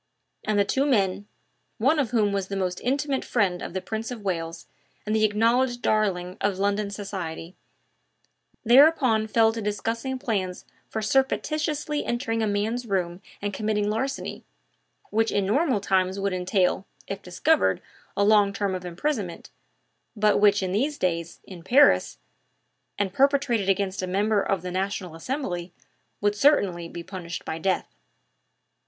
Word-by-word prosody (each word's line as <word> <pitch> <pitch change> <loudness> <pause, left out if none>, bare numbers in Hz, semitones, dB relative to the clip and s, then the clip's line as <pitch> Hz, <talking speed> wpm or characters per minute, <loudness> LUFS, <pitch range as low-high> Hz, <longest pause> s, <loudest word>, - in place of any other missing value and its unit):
And 215 -1 0
the 200 - +4
two 270 +7 +1
men 200 -5 +1 0.5
one 270 +8 +3
of 265 -6 +1
whom 215 -4 +2
was 195 -1 -1
the 195 - -4
most 185 -2 -2
intimate 275 +2 0
friend 190 -7 0
of - - -6
the 190 - -2
Prince 220 +4 -4
of 245 -3 -6
Wales 165 -3 -3 0.4
and 215 +1 0
the 220 - +2
acknowledged 240 +4 +2
darling 190 -4 0
of 200 -2 0
London 200 +1 0
society 185 -4 -6 1.1
thereupon 250 -3 +5
fell 225 0 +3
to 225 - -4
discussing 225 +5 -2
plans 195 -7 -3 0.2
for 220 - -3
surreptitiously 300 +4 0
entering 240 -2 -1
a 220 - +1
man's 220 +4 -1
room 180 -2 -1 0.2
and 205 -1 -2
committing 210 0 0
larceny, 265 +5 -3 0.7
which 225 +1 +2
in 200 -1 +1
normal 255 - +2
times 190 -1 +1
would 195 -1 -1
entail, 185 +1 +1 0.2
if 195 0 -5
discovered, 295 - +2 0.4
a 200 - +3
long 205 -1 +5
term 200 -1 -1
of 185 -1 -4
imprisonment, 180 - -3 0.6
but 210 -1 +3
which, 205 -1 +4
in 185 - -2
these 275 +9 0
days, 170 -2 -2
in 180 -3 -11
Paris, 260 +11 +4 0.8
and 200 -2 -1
perpetrated 270 -6 +2
against 195 0 0
a 185 - -3
member 205 +3 +1
of 195 -3 -1
the 180 - -4
National 190 -1 -3
Assembly, 175 - -4 0.5
would 205 0 +2
certainly 195 - +2
be 170 0 -7
punished 170 -2 -7
by 160 - -4
death. 190 +2 -1
205 Hz, 150 wpm, -25 LUFS, 185-235 Hz, 1.1 s, thereupon